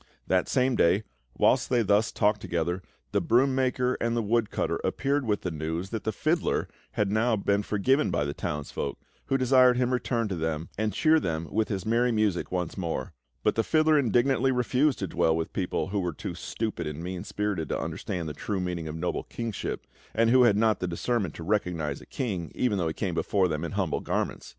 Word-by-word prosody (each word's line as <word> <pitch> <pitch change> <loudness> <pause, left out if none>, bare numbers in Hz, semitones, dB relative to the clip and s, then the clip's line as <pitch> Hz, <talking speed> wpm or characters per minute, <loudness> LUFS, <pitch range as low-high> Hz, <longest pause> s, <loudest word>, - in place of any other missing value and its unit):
That 95 -1 +1
same 130 -1 +2
day, 100 +1 +3 0.3
whilst - - +3
they 120 -2 +3
thus 105 +2 +3
talked 105 -1 +1
together, 85 0 -1 0.3
the - - +2
broom 130 +3 +3
maker 130 -1 +1
and 115 0 0
the 115 - +1
woodcutter 110 +1 0
appeared 140 -1 0
with 105 -1 +1
the 90 - -3
news 80 +4 -3
that 110 -2 -4
the 110 - +1
fiddler 155 - 0 0.3
had 105 -2 0
now 110 +2 +2
been 100 0 +1
forgiven 130 +8 +2
by 75 - 0
the 70 - -3
townsfolk, 70 -1 -4 0.3
who 135 - +1
desired 130 -1 +5
him 125 -1 +2
to - - 0
return 120 -2 0
to 95 - -2
them, 80 -1 -2
and 110 +1 0
cheer 160 +5 +4
them 80 - -2
with 110 +1 +1
his 95 -3 -3
merry 120 +2 +2
music 105 -5 0
once 90 +1 -2
more; 85 -3 -3 0.3
but - - +3
the 115 - +1
fiddler 155 +1 +4
indignantly 130 +2 +2
refused 130 +3 +2
to 95 - -3
dwell 80 -1 +2
with 80 - -3
people 95 0 -1
who 100 +1 -1
were 90 -3 -2
too - - -5
stupid 110 -7 -4
and 75 +2 -5
mean 90 0 -4
spirited 100 -7 -2
to - - -1
understand 90 -4 -4
the 75 - -4
true 100 +7 -3
meaning 90 -3 -3
of 80 - -5
noble 85 +2 -2
kingship, 115 -3 -4 0.3
and 115 +1 +4
who 125 0 +6
had 105 -4 +4
not 110 0 +3
the 90 - -2
discernment 95 +1 -1
to 85 - -7
recognise 85 -7 -1
a - - -14
king, 95 -10 -3
even 110 -6 +1
though 85 - 0
he 80 - -1
came 95 -4 -2
before 95 +3 +1
them 75 -1 -2
in 85 - -4
humble 95 -5 0
garments. - - -2
105 Hz, 210 wpm, -27 LUFS, 85-120 Hz, 0.3 s, who